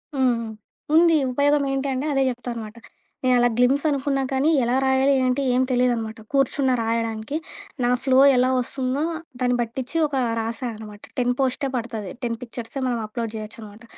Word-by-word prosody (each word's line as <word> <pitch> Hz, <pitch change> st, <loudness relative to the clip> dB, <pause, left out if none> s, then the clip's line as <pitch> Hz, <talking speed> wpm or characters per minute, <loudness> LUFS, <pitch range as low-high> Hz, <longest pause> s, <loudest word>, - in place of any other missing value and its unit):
హ్మ్. 265 Hz, -1 st, +3 dB
హ్మ్. 230 Hz, -1 st, -5 dB, 0.5 s
ఉంది. 330 Hz, 0 st, +6 dB, 0.2 s
ఉపయోగమేంటి 280 Hz, 0 st, +1 dB
అంటే, 260 Hz, +3 st, -2 dB
అదే 270 Hz, -1 st, +2 dB
జెప్తా 245 Hz, 0 st, -5 dB
అనమాట. 220 Hz, 0 st, -8 dB, 0.5 s
నేనలా 245 Hz, -1 st, +4 dB
గ్లిమ్స్ 255 Hz, +3 st, +3 dB
అనుకున్నా 275 Hz, -1 st, 0 dB
కానీ 270 Hz, +4 st, +2 dB
ఎలా 240 Hz, +2 st, +1 dB
రాయాలి, 265 Hz, +1 st, +3 dB
ఏంటి, 255 Hz, +2 st, +1 dB
ఏం 250 Hz, -, +3 dB
తెలీదనమాట. 240 Hz, -3 st, 0 dB
కూర్చున్నా 275 Hz, -1 st, +2 dB
రాయడానికి. 225 Hz, +2 st, -2 dB, 0.5 s
నా 245 Hz, -, +2 dB
ఫ్లో 265 Hz, -1 st, +4 dB, 0.2 s
ఎలా 255 Hz, +1 st, +3 dB
ఒస్తుందో 260 Hz, +3 st, -2 dB, 0.4 s
దాన్ని 250 Hz, -1 st, +2 dB
బట్టిచ్చి, 245 Hz, +6 st, -3 dB
ఒక 290 Hz, -2 st, -3 dB, 0.2 s
రాసా 230 Hz, +3 st, -3 dB
అనమాట 210 Hz, -1 st, -11 dB, 0.2 s
10 245 Hz, -1 st, +2 dB
పోస్టే 270 Hz, +1 st, 0 dB
పడతది. 225 Hz, -5 st, -4 dB
10 235 Hz, -1 st, -1 dB
పిక్చర్సే 240 Hz, +1 st, -6 dB
మనం 245 Hz, -, 0 dB
అప్‌లోడ్ 225 Hz, +1 st, -4 dB
జేయొచ్చనమాట. 215 Hz, 0 st, -9 dB
250 Hz, 155 wpm, -23 LUFS, 230-270 Hz, 0.5 s, ఉంది